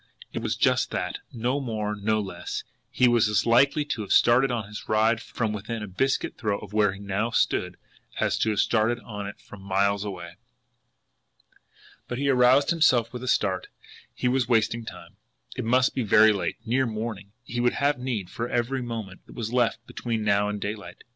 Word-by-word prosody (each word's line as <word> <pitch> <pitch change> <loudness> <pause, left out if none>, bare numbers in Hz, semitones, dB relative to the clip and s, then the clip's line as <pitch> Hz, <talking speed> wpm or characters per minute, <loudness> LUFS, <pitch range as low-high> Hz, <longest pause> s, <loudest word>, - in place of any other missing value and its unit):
It - - -3
was - - -1
just - - +2
that, - - -3
no 125 +4 -1
more, 110 -5 -3
no 110 +1 0
less 100 -2 -5 0.3
he 125 - +3
was 120 -2 +3
as 105 -2 +1
likely 140 +5 +4
to 145 -6 -3
have 100 - -6
started 130 +3 +5
on 115 -5 -2
his 105 0 -9
ride 110 +1 +3
from 110 -3 -3
within 110 +2 -5
a - - -5
biscuit 130 +8 -1
throw 105 -3 0
of 105 0 -11
where 105 -2 +3
he 100 - -10
now 100 +3 -1
stood, 105 - 0 0.4
as - - +1
to 110 - +2
have 105 - -1
started 115 +1 +2
on 105 -1 -6
it 100 - -9
from 100 - -13
miles 100 +1 +1
away! 85 -4 -7 1.7
But 120 - -4
he 140 +1 0
aroused 130 +3 +5
himself 130 -9 +3
with 125 - -6
a 130 - -6
start 95 -6 +1 0.5
he - - -1
was 125 -1 +1
wasting 115 0 +1
time! - - -11 0.4
It - - -4
must 125 +2 +3
be 130 - -1
very 110 0 +6
late, 100 - -2
near 130 +3 +1
morning, 110 -3 -5
and - - -9
he 120 - -1
would 120 0 +2
have 140 -2 +1
need 120 -8 -3
for 115 +1 -4
every 125 +2 -1
moment 110 -6 -7
that - - -14
was 115 0 -4
left 120 -1 +1
between 115 -3 -3
now 100 0 +2
and 105 0 -3
daylight. 105 +1 -6
110 Hz, 200 wpm, -26 LUFS, 105-125 Hz, 1.7 s, very